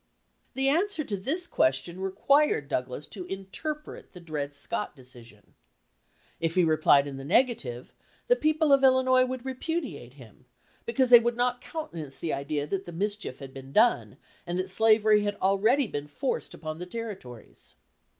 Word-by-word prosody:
The 265 +1 +1
answer 330 +3 +1
to 210 - -3
this 280 - -2
question 130 - 0
required 195 - +2
Douglas 125 +2 -3
to 185 -4 -7
interpret 195 - -6
the 180 - -10
Dred 150 -4 -5
Scott 210 +6 -4
decision. 120 -5 -17 0.9
If 165 0 -1
he 180 - +4
replied 155 -3 +4
in 140 -2 -6
the 135 - -7
negative, 140 - 0 0.3
the - - +5
people 310 - +2
of 275 0 +4
Illinois 260 -1 +5
would 255 0 -5
repudiate 260 - -4
him, 125 -1 -16 0.4
because 250 +1 +1
they 240 - +11
would 235 0 -1
not 245 0 0
countenance 170 - -6
the 165 - -3
idea 145 +1 -2
that 195 +5 -3
the 175 - -8
mischief 205 -4 -3
had 135 -1 -10
been 135 -1 -10
done 225 +9 +2 0.3
and 175 +1 -2
that 185 +1 -1
slavery 215 0 +4
had 205 0 -2
already 215 +8 +3
been 145 -8 -5
forced 255 - -3
upon 155 0 -6
the 180 - -6
Territories. 190 - -9
195 Hz, 160 wpm, -27 LUFS, -, 0.9 s, they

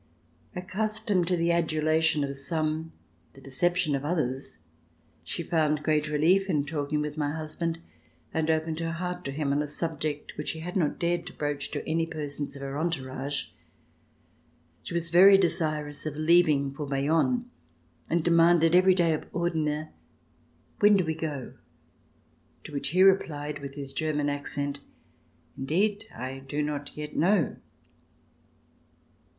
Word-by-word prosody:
Accustomed 195 0 -1
to 180 0 +1
the 170 0 +2
adulation 160 -2 +2
of 140 0 -3
some, 155 +2 -2 0.4
the - - -15
deception 165 +4 0
of 140 0 -1
others, 135 - -2 0.7
she - - -4
found 155 -2 +1
great 155 -1 +1
relief 170 +6 +3
in 150 -5 +1
talking 150 0 -2
with 150 0 -4
my 145 -1 0
husband 160 +1 -3 0.6
and 160 0 0
opened 160 0 0
her 165 0 -2
heart 180 +1 -4
to 135 - -2
him 140 0 -1
on 145 - +1
a 150 - -2
subject 150 -1 -3
which 150 - -3
she 160 - -4
had 175 +2 -6
not 160 -6 +1
dared 175 0 -1
to - - -8
broach 145 -1 -3
to - - -5
any 165 +1 +1
persons 145 -3 -5
of 140 - -8
her 135 +1 -4
entourage. 140 -4 -2 1.3
She - - -6
was 170 -1 -2
very 195 +3 +8
desirous 155 -5 -1
of 150 - -4
leaving 155 -3 +3
for 145 +1 -5
Bayonne 160 - +1 0.6
and 170 -1 +1
demanded 170 0 +5
every 185 +1 +6
day 170 -3 +3
ofOrdener:"When 160 +5 -2
do 185 - +1
we 160 - 0
go.'' 155 -5 -5 0.6
" - - -37
to - - -9
which 140 - -2
he 180 +6 +4
replied 150 -6 +2
with 140 -1 -8
his 140 -2 -4
German 150 -2 0
accent: 145 0 -3 0.4
*' 85 0 -36
Indeed, 195 +10 0
I 130 +3 -6
do 145 +3 -3
not 145 -1 -4
yet 150 0 -6
know." 180 -2 +2
155 Hz, 150 wpm, -28 LUFS, 145-170 Hz, 1.3 s, very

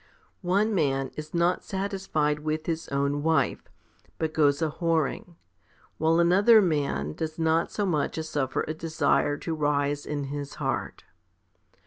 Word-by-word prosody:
25. 195 +3 +2
One 220 - -2
man 135 -6 0
is 155 0 -7
not 175 +1 +1
satisfied 190 -7 -1
with 155 +1 -3
his 165 -1 -3
own 140 +1 0
wife, 160 +1 +1 0.6
but 160 -1 -2
goes 145 -2 +3
a 160 -2 0
whoring, 165 +1 -1 0.6
while 160 +1 +3
another 195 +7 +6 0.5
does 155 - -5
not 160 0 +1
so 205 - -1
much 160 -5 -1
as 160 0 -3
suffer 135 -4 -1
a 155 - -2
desire 155 -2 +1
to 165 - -4
rise 145 -1 0
in 145 -1 -2
his 140 +1 -5
heart. - - -3
160 Hz, 145 wpm, -27 LUFS, 145-170 Hz, 0.6 s, another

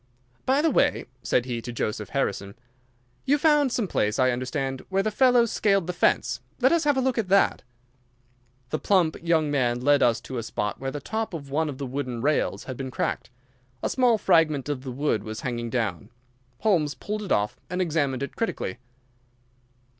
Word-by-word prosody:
"By 275 +3 +3
the 325 - +3
way," - - +2 0.2
said 125 - +1
he 120 -2 -3
to 120 - -6
Joseph 105 -3 -3
Harrison, 100 -7 -2 0.7
"you 285 +2 +3
found 295 -3 +3
some 230 -4 0
place, 105 -9 0
I 130 -1 +3
understand, 130 +2 -3
where 195 +1 +1
the 215 - 0
fellow 245 +1 +4
scaled 195 -4 +1
the 180 - -3
fence. 125 -7 +1 0.2
Let 260 - +4
us 335 -2 +2
have 290 -2 +3
a - - +3
look 255 -2 0
at 215 - -1
that!" 195 +1 +3 1.1
The 155 - -1
plump 180 -6 +2
young 160 -3 +1
man 120 -4 +1
led 145 +3 +3
us 120 -1 +3
to 130 -2 -5
a - - -2
spot 105 -2 -3
where 135 - -3
the 145 - -5
top 220 +2 -3
of 140 -4 -8
one 155 +2 0
of 135 - -6
the 140 - -4
wooden 130 -2 -4
rails 145 +5 0
had 130 -2 -7
been 135 -1 -4
cracked. 130 - -2 0.5
A - - +1
small 245 -3 +3
fragment 160 -8 +2
of 140 -3 -2
the 130 - -7
wood 130 -4 0
was 110 0 -6
hanging 120 -2 -3
down. 110 -5 -2 0.5
Holmes 165 -9 +2
pulled 210 +1 -4
it 205 - -6
off 105 0 +1
and 180 +1 -3
examined 145 -7 0
it 140 - -6
critically. 220 - -3
145 Hz, 195 wpm, -25 LUFS, 125-200 Hz, 1.1 s, fellow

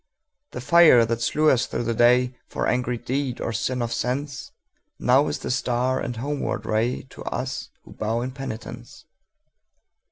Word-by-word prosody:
The - - -5
fire 145 -4 +6
that 115 +1 -2
slew 150 +6 +3
us 130 -2 +1
through 120 - -3
the 115 0 -1
dayFor 125 +2 +2
angry 125 -1 0
deed 130 +1 -3
or 115 - -3
sin 125 +2 -1
of 115 - -3
senseNow 135 +1 -2
is - - -2
the - - -4
star 130 0 0
and 120 - -4
homeward 135 -2 -3
rayTo 115 +4 -2
us 130 +1 -4
who - - -14
bow 110 +2 -2
in 125 +2 -3
penitence. 120 -2 -8
125 Hz, 150 wpm, -24 LUFS, 120-130 Hz, -, fire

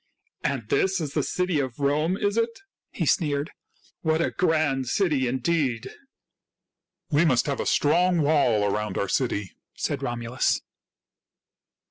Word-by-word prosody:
"And 130 -6 -2
this 190 0 +2
is 150 -4 -4
the 150 - +1
city 180 +2 0
of 130 -4 -3
Rome, 150 +6 +1
is 205 0 0
it?" 230 +4 -1 0.3
he - - -3
sneered. 150 -3 +1 0.3
" - - -33
What 160 -1 +1
a 170 - +1
grand 155 -7 +1
city, 150 -4 +1
indeed! 130 -2 -1 0.4
" - - -63
" - - -62
We 150 +3 +4
must 130 -7 +3
have 140 -2 -2
a - - -2
strong 175 +2 +3
wall 140 -8 +3
around 105 0 -1
our 100 - 0
city," 105 -4 -1 0.2
said 140 - -2
Romulus. 120 -1 -1
145 Hz, 150 wpm, -25 LUFS, 130-170 Hz, 0.4 s, We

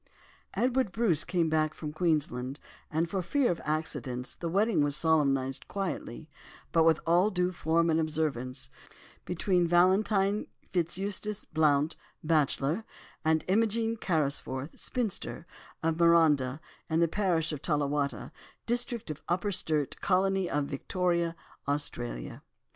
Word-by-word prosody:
'" - - -31
Edward 255 -3 +1
Bruce 190 -9 +2
came 175 -3 +1
back 155 -1 +1
from 150 -1 -6
Queensland, 150 -5 0 0.3
and 160 +2 0
for 190 +2 -2
fear 255 +8 +1
of 170 - -4
accidents 140 -5 -3
the 170 - -4
wedding 195 -1 +2
was 145 -1 +2
solemnised 140 -5 +1
quietly, 180 -7 -4 0.4
but 165 -1 +4
with 160 -2 +4
all 175 +5 +4
due 180 -2 0
form 165 -1 +1
and 160 - +2
observance, 135 -5 -1 0.5
between 180 0 +1
Valentine 195 +3 +3 0.3
FitzEustace 195 +4 -2
Blount, 155 -1 +2 0.3
bachelor, 155 +3 +1 0.4
and 160 0 +2
Imogen 225 +3 +2
Carrisforth, 145 -6 -1
spinster, 220 -8 -2 0.4
of 165 0 +1
Marondah, 155 -5 +4 0.3
in 160 0 +2
the 170 - +4
parish 165 -3 +1
of 150 -2 -5
Tallawatta, 145 -5 -1 0.3
district 240 -5 0
of 150 - -8
Upper 180 +4 0
Sturt, 155 -6 -1
colony 190 -1 +2
of 145 -1 0
Victoria, 170 +3 -1 0.3
Australia. - - -3
165 Hz, 125 wpm, -29 LUFS, 150-185 Hz, 0.5 s, but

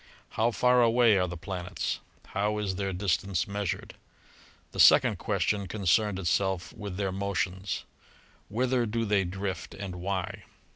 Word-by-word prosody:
How 115 +2 +1
far 125 +2 +4
away 115 -3 +5
are 90 - +1
the 90 0 -6
planets? 90 +1 -4 0.3
How 105 +1 0
is 100 -3 -2
their 100 -1 -1
distance 95 -1 0
measured? 100 -2 -3 0.8
The - - -8
second - - +6
question 100 -2 0
concerned 100 +1 +1
itself 95 0 0
with 100 -3 -6
their 100 -2 -1
motions, 95 -2 -2 0.7
Whither 125 +1 +1
do 115 +2 -1
they 100 -2 +2
drift 95 +1 -4
and 95 -2 -6
why? 95 0 -3
100 Hz, 140 wpm, -28 LUFS, 95-105 Hz, 0.8 s, second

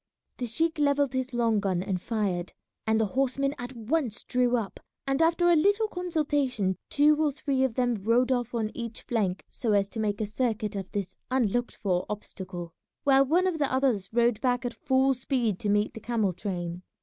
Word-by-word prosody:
The 245 - -3
sheik 320 +7 0
levelled 285 -2 +2
his 260 0 -2
long 230 -3 +2
gun 190 -3 0
and 185 -2 -2
fired, 195 -6 -2 0.3
and 220 0 +3
the 220 - +3
horsemen 275 +5 0
at 245 +1 -6
once 240 0 -1
drew 250 -1 +2
up, 215 -4 -4 0.3
and 275 +2 +1
after 335 +2 +3
a 345 - +6
little 405 +7 +3
consultation 290 - 0
two 300 +2 +4
or 300 - +2
three 275 -2 -1
of 255 -4 0
them 245 -1 +2
rode 240 +4 +3
off 245 -1 -1
on 220 -2 -1
each 235 -2 -6
flank 200 -6 -1
so 225 -4 -1
as 200 -1 +2
to 225 - -6
make 205 -2 -1
a 215 - 0
circuit 215 -1 -1
of 195 -2 -5
this 200 -3 -4
unlooked 245 -2 0
for 180 -3 -1
obstacle, 185 -4 -6 0.3
while 275 -1 +5
one 335 +7 +2
of 360 -4 0
the 285 -2 +1
others 260 -7 +1
rode 235 -1 +2
back 245 -1 +1
at 245 - -2
full 265 0 +2
speed 240 -5 -1
to 210 - -2
meet 205 +1 +2
the - - -7
camel 220 -4 0
train. 175 -2 -4
240 Hz, 195 wpm, -28 LUFS, 210-275 Hz, 0.3 s, a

